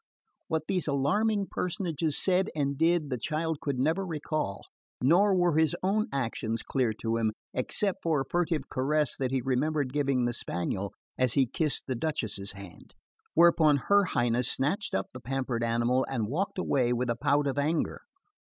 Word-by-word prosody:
What 160 -3 -1
these 180 -4 -1
alarming 200 +9 +1
personages 165 -4 -1
said 190 0 +2
and 140 -2 0
did, 165 -1 +2
the 125 - -1
child 160 +4 -2
could 140 -3 -2
never 160 +9 +1
recall; 155 - -3 0.4
nor 190 +9 +4
were 175 -3 +2
his 160 -2 +3
own 210 +3 +1
actions 115 -4 -2
clear 130 -4 0
to 115 +1 -2
him, 110 -2 0 0.2
except 190 +9 -1
for 160 -3 +1
a - - -3
furtive 175 -1 0
caress 145 +2 0
that 130 -2 -1
he 130 0 0
remembered 135 +2 0
giving 140 -4 +1
the 120 - 0
spaniel 95 -2 -2 0.3
as 130 -3 +3
he 135 - +4
kissed 150 +4 -1
the 130 - -2
Duchess's 115 -8 -2
hand; 100 -3 -12 0.4
whereupon 165 -3 +5
her 200 +8 +3
Highness 120 -5 +1
snatched 155 +10 -1
up 95 - -2
the 130 - -7
pampered 130 -2 -2
animal 120 +2 +2
and 120 -5 -1
walked 175 - -2
away 130 -9 +1
with 120 0 0
a - - -1
pout 145 +4 +1
of 140 0 -1
anger. 155 +3 -1
140 Hz, 170 wpm, -29 LUFS, 125-165 Hz, 0.4 s, whereupon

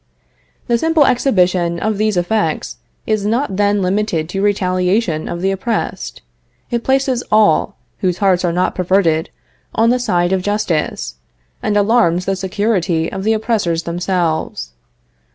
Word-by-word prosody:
The 235 -2 +1
simple 320 -1 +3
exhibition 180 -10 +2
of 215 +1 -1
these 215 -3 +1
effects 175 -2 -1 0.3
is 215 -2 0
not 220 -1 -1
then 205 -1 +2
limited 180 -4 -1
to 195 +2 -3
retaliation 185 -3 0
of 170 0 -4
the 195 - +2
oppressed; 210 +4 -3 0.5
it 235 -1 -1
places 265 -2 +1
all, 215 -1 +3 0.2
whose 180 -2 0
hearts 190 -3 +2
are 175 - +1
not 180 +2 0
perverted, 180 -3 +1 0.5
on 230 +1 +3
the 250 - +1
side 175 -7 +1
of 190 - +1
justice, 185 - -2 0.4
and 210 -1 0
alarms 200 -5 +2
the 195 - 0
security 190 -3 -1
of 190 0 -5
the 220 +2 +2
oppressors 210 -7 0
themselves. 170 - -2
195 Hz, 140 wpm, -17 LUFS, 175-220 Hz, 0.5 s, simple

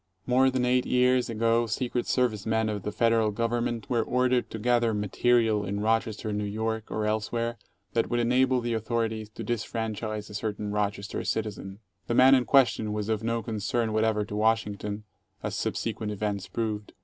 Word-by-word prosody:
More 130 +1 +4
than 130 -1 0
eight 125 0 +2
years 125 0 +3
ago 115 +1 +2
Secret 120 +2 -2
Service 110 -5 0
men 110 0 +1
of 105 -1 -3
the 105 - -4
Federal 115 0 +2
Government 115 0 -1
were 120 -2 +1
ordered 125 +1 +1
to - - -6
gather 120 0 +2
"material" 110 +1 +2
in 100 +1 -3
Rochester, 110 0 0
N. 105 0 -1
Y., 110 +2 -2
or 110 0 -2
elsewhere, 115 +2 -1 0.3
that 115 - +1
would 120 - +1
enable 125 +2 +3
the 120 0 -2
authorities 110 -1 -2
to 115 - -8
disfranchise 110 -1 -3
a 105 - -11
certain 105 0 -3
Rochester 100 -1 -2
citizen. 105 -2 -4 0.3
The 120 - 0
man 130 +2 +7
in 130 -2 +4
question 120 -6 +3
was 105 0 -3
of 110 -2 0
no 115 0 -1
concern 110 0 -1
whatever 110 -1 +1
to 105 - -6
Washington, 105 -1 0 0.4
as - - -3
subsequent 110 -1 -2
events 100 -1 -3
proved. 105 +1 -3
110 Hz, 175 wpm, -27 LUFS, 105-120 Hz, 0.4 s, man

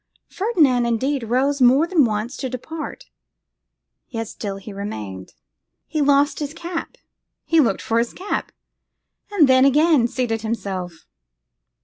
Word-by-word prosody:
Ferdinand, 300 - +2
indeed, 260 +4 0
rose 260 +5 0
more 260 +5 +6
than 335 -6 +3
once 220 +4 -2
to 260 - -3
depart; 310 +6 -7 1.0
yet 225 -2 -4
still 200 -2 -6
he 200 +1 -9
remained. 105 - -7 0.5
He 305 +1 -2
lost 285 +1 +3
his 295 +1 -4
cap; 340 -1 -5 0.5
he 330 - +3
looked 235 -10 +2
for 230 0 +1
his 235 0 -1
cap; 385 +3 -4 0.8
and 380 -9 +4
then 260 0 +5
again 290 -2 +4
seated 235 -3 -2
himself. 190 -7 -4
255 Hz, 130 wpm, -21 LUFS, 225-295 Hz, 1.0 s, more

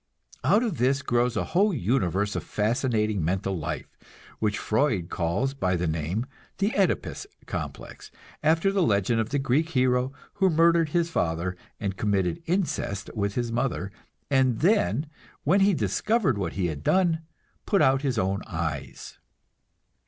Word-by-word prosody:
Out 220 - +4
of 220 -9 -2
this 135 +3 +2
grows 120 0 +1
a - - +1
whole 195 +2 +2
universe 100 - 0
of - - -2
fascinating 110 - 0
mental 95 +3 -1
life, 75 -4 -5 0.4
which 105 -1 0
Freud 110 - 0
calls 95 +11 0
by 95 -9 0
the 90 0 -1
name 80 +8 -1 0.3
"the 200 +3 0
[OE]dipus 200 - 0 0.2
complex" - - -6 0.3
after 165 +5 +3
the 195 -1 +1
legend 110 - +2
of 110 - -3
the 145 - 0
Greek 140 +4 +1
hero 125 -3 +2 0.3
who 190 - +5
murdered 165 0 +4
his 170 +1 0
father 85 - -1 0.2
and 100 -3 -3
committed 95 - 0
incest 165 - -1
with 100 -2 -2
his 120 -1 -1
mother, 115 -5 -1 0.4
and 130 -4 +2
then, 155 - +2 0.4
when 180 +8 +4
he 200 +1 +5
discovered 215 - +1
what 95 -5 -3
he 95 -1 -1
had 75 -4 -3
done, 175 - +2 0.5
put 200 - +3
out 135 0 +4
his 135 -4 -1
own 95 0 0
eyes. 80 -5 -5
120 Hz, 150 wpm, -26 LUFS, 95-160 Hz, 0.5 s, who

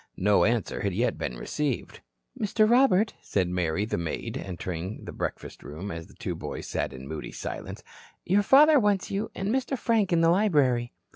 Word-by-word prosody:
No 100 +2 +4
answer 115 0 0
had 100 -3 -1
yet 120 +2 0
been 60 - -3
received. 140 - -3 0.4
"Mister 215 +1 +2
Robert," 220 -3 +4
said 95 -3 0
Mary, 90 +2 0
the 105 - -2
maid, 85 -2 -4
entering 90 +1 -5
the - - -6
breakfast - - -5
room, 80 +8 -7
as 80 0 -7
the - - -18
two - - -4
boys - - -6
sat - - -2
in 65 0 -9
moody 80 0 -6
silence, - - -6 0.4
"your 195 +3 +3
father 290 +7 +7
wants 205 -4 +1
you 205 +3 -2
and 195 +2 -2
Mister 265 +1 0
Frank 225 -6 +1
in 170 -1 +3
the 165 0 +5
library." 145 - +2
125 Hz, 185 wpm, -27 LUFS, -, 0.4 s, father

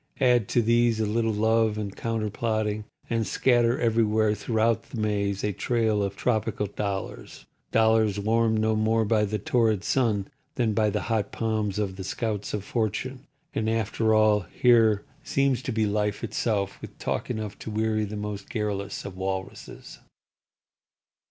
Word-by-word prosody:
Add 125 -6 +3
to 120 - +2
these 115 0 +3
a 110 - +1
little 115 +2 +1
love 110 0 +2
and 100 -2 -4
counterplotting, 110 -1 -2 0.2
and 115 -2 -1
scatter 120 -1 +2
everywhere 110 -2 +2
throughout 110 +1 +1
the 115 - -6
maze 100 -2 -1
a 105 - +1
trail 110 +1 +1
of 100 -1 -2
tropical 110 -2 0
dollars—dollars 105 +2 -1
warmed 110 +1 +2
no 110 0 +2
more 110 +1 +2
by 105 0 +2
the 105 +1 -2
torrid 110 -1 +1
sun 105 -6 +1 0.3
than 115 -5 +1
by 110 0 +2
the 105 +1 -1
hot 110 -3 -1
palms 110 -3 -1
of 100 -3 -2
the 95 - -5
scouts 105 +1 -3
of 105 - -4
Fortune—and, 125 - -3
after 110 0 +1
all, 110 -1 +5
here 110 +2 +3 0.2
seems 135 -2 +1
to 130 - -3
be 110 -1 +1
Life, 105 +1 -1
itself, 105 -3 -1
with - - -10
talk - - -3
enough 110 -4 -4
to - - -7
weary 110 0 0
the 105 0 -5
most 105 -1 -5
garrulous 100 -3 -3
of 100 -2 -7
Walruses. 95 0 -6
110 Hz, 150 wpm, -26 LUFS, 105-115 Hz, 0.3 s, all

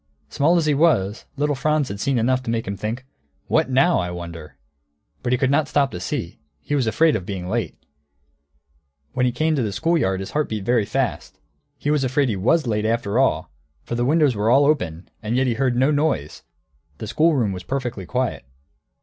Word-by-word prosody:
Small 150 - +2
as 165 - +1
he 150 - +3
was, 130 - +2
little 145 +1 +1
Franz 150 +1 +1
had 100 - -6
seen 135 +4 0
enough 130 +3 +2
to 130 - -6
make 115 0 -1
him 100 - -3
think, 115 +5 -4 0.4
"What 160 -3 +1
now, 135 +7 +3
I 90 - -2
wonder?" 85 -3 -8 0.6
But 125 - -2
he 125 - +3
could 130 +1 +1
not 145 +1 +2
stop 140 -2 +1
to 90 - -6
see; 90 - -4 0.2
he 145 - -5
was 135 -5 +1
afraid 160 +7 +3
of 100 - -2
being 90 -1 -5
late. 95 - -2 1.4
When 125 0 +2
he - - +1
came 155 +6 +1
to 140 - 0
the 110 -3 -1
school 165 - +1
yard 95 -8 0
his 95 - -6
heart 150 0 0
beat 105 -3 -4
very 120 -2 +2
fast; - - -2 0.4
he 145 - -1
was 150 -2 +2
afraid 130 +1 +1
he 105 - 0
was 130 - +2
late, 105 -3 0
after 110 0 0
all, 80 -13 +1 0.3
for - - -6
the 120 +1 0
windows 145 -1 +3
were 105 +2 +1
all 140 +4 +5
open, 90 - 0
and 110 +2 -2
yet 130 - +2
he 125 - +1
heard 130 +1 0
no 130 +4 +3
noise, 145 - -1 0.6
the - - -6
schoolroom 150 -10 +2
was 90 -1 -5
perfectly 120 -5 -4
quiet. 125 - -2
125 Hz, 210 wpm, -22 LUFS, 105-145 Hz, 1.4 s, all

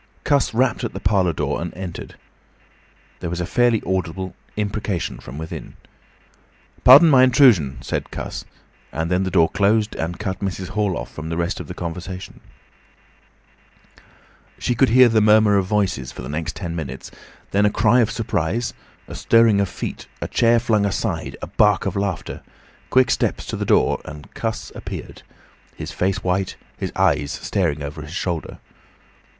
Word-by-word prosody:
Cuss 140 -2 +2
rapped 125 +2 +1
at 120 - -3
the 95 - -5
parlour 95 -2 +2
door 75 -2 -2
and 85 -1 -4
entered. 90 -2 -7 1.0
There 85 - -4
was 90 +1 -3
a 90 - -1
fairly 120 +2 +2
audible 95 0 -2 0.2
imprecation 105 -3 -2
from 65 +3 -10
within. 80 +1 -7 1.1
"Pardon 140 +7 +9
my 135 -5 +6
intrusion," 120 - +5
said - - -3
Cuss, - - -6 0.5
and 80 +2 -3
then 90 +1 +2
the - - -1
door 85 -3 +4
closed 105 +3 +1
and 85 +2 -3
cut 95 -3 -4
Mrs. 95 -2 -4
Hall 100 -4 0
off - - -6
from 80 +1 -6
the 80 - -3
rest 85 +4 -1
of - - -7
the 90 - -7
conversation. 90 +2 -6 2.2
She 125 - -1
could 130 +2 +3
hear 125 +2 +7
the 110 -2 +3
murmur 105 -1 +5
of 95 -2 +1
voices 95 -11 0
for - - -9
the 65 - -7
next 80 +2 -3
ten 85 -4 -5
minutes, 65 -6 -6 0.4
then 100 +1 +3
a - - +3
cry 115 +3 +3
of 115 -2 +3
surprise, 115 0 -2 0.3
a - - -9
stirring 115 -3 +4
of 100 - -1
feet, - - -6
a - - -3
chair 115 0 +3
flung 110 -3 +1
aside, 100 -1 -2
a - - -4
bark 105 -1 +3
of 95 - -2
laughter, 100 0 -3 0.5
quick 130 -2 +4
steps - - 0
to - - -4
the - - -3
door, - - +2
and 75 0 -10
Cuss 110 -1 -4
appeared, - - -8 0.5
his - - -6
face 95 +1 -1
white, 95 +1 -1 0.2
his - - -4
eyes 70 - +2
staring 75 -7 -1
over 75 +2 -6
his 75 +3 -9
shoulder. 85 -4 -3
95 Hz, 170 wpm, -21 LUFS, 85-110 Hz, 2.2 s, Pardon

